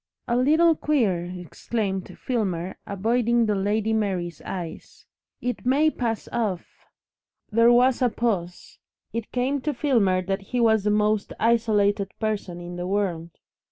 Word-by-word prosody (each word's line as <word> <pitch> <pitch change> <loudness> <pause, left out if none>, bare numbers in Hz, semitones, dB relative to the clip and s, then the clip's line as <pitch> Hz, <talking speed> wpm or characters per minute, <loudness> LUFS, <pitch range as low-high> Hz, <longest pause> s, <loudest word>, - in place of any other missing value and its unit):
"A 235 - +1
little 310 +7 +4
queer," 225 - 0
exclaimed 190 +2 -4
Filmer, 190 -8 -2
avoiding 230 +4 +1
the 210 - +1
Lady 205 +3 0
Mary's 185 -7 -2
eyes. 175 -4 -7 0.4
"It 245 -2 -3
may 285 +5 +3
pass 230 -5 -3
off 205 -7 -3 0.3
" - - -50
There 230 +2 +5
was 250 +2 +4
a 250 - +4
pause. 195 -7 -3 0.3
It 230 -1 -4
came 260 +3 0
to 300 0 -2
Filmer 210 -11 +2
that 195 +2 -2
he 245 +6 -3
was 220 -3 +3
the - - +3
most 210 0 +1
isolated 210 -4 +2
person 210 -5 -2
in 175 0 -7
the 175 0 -4
world. 185 -4 -1
215 Hz, 145 wpm, -24 LUFS, 190-240 Hz, 0.4 s, There